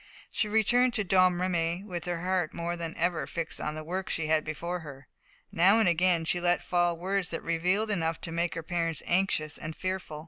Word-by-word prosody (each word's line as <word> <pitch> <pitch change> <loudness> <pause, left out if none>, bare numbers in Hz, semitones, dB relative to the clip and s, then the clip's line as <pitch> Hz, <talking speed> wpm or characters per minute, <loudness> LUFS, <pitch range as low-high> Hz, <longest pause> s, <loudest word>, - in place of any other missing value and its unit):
She 215 - 0
returned 240 +3 +3
to 215 - +1
Domremy 180 -2 +2
with 175 -4 -5
her 175 -1 -2
heart 180 -2 -1
more 170 +1 -2
than 165 -1 -6
ever 165 -5 0
fixed 165 -1 -3
on 150 - -3
the 155 - -6
work 185 +4 -4
she 165 - 0
had 155 0 +2
before 170 +3 -4
her. 145 -4 -11 0.4
Now 190 +6 +5
and 220 - +3
again 175 -1 +3
she 175 +2 +1
let 175 0 +2
fall 175 -1 +1
words 190 +1 -1
that 165 - -4
revealed 180 +6 +1
enough 165 -4 -1
to 165 - -3
make 170 +2 -1
her 165 - -4
parents 165 -1 -2
anxious 175 -5 +1
and 155 0 -6
fearful. 185 -5 -4
175 Hz, 205 wpm, -29 LUFS, 165-185 Hz, 0.4 s, Now